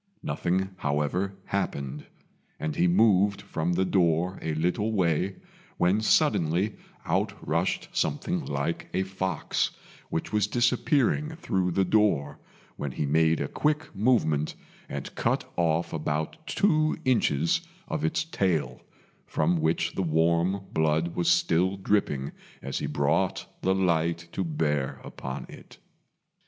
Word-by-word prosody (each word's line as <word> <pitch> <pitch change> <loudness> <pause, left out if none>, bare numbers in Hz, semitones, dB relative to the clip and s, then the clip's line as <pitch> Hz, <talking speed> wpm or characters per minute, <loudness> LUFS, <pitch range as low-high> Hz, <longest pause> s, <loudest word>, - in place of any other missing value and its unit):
Nothing, 95 +2 -1
however, 75 +7 -1
happened, 70 -7 -3 0.5
and 75 -1 -2
he 90 - +3
moved 100 +1 +4
from 80 +3 -2
the 95 +2 +2
door 90 0 +1
a 80 -1 -2
little 90 +7 0
way, 90 0 +1 0.4
when 90 +5 +3
suddenly 105 - +2 0.3
out - - +1
rushed - - 0
something 170 +3 -1
like 80 +4 -2
a 95 - +2
fox, 95 -1 -1 0.4
which 80 - -3
was 105 -1 +2
disappearing 135 +6 +1
through 95 - 0
the 95 +2 +1
door, 90 -9 +2 0.4
when 70 -3 -4
he 75 - -1
made 80 +3 +3
a - - -1
quick 150 +1 -1
movement 95 - +2 0.3
and - - -5
cut - - 0
off 85 -1 +1
about 80 - -3
two 155 -6 +2
inches 85 - +2 0.3
of - - -3
its 80 - +1
tail, 85 - -1 0.5
from 80 +1 +1
which 80 +1 +1
the - - -1
warm 85 +3 +1
blood 80 +2 +1
was 85 -1 +1
still 90 +2 +3
dripping 95 -9 0 0.3
as 70 - -3
he - - -2
brought 80 +6 0 0.2
the 95 0 +2
light 85 -2 +1
to 95 - -2
bear 75 -4 -1
upon 65 0 -6
it. - - -13
85 Hz, 130 wpm, -27 LUFS, 80-100 Hz, 0.5 s, moved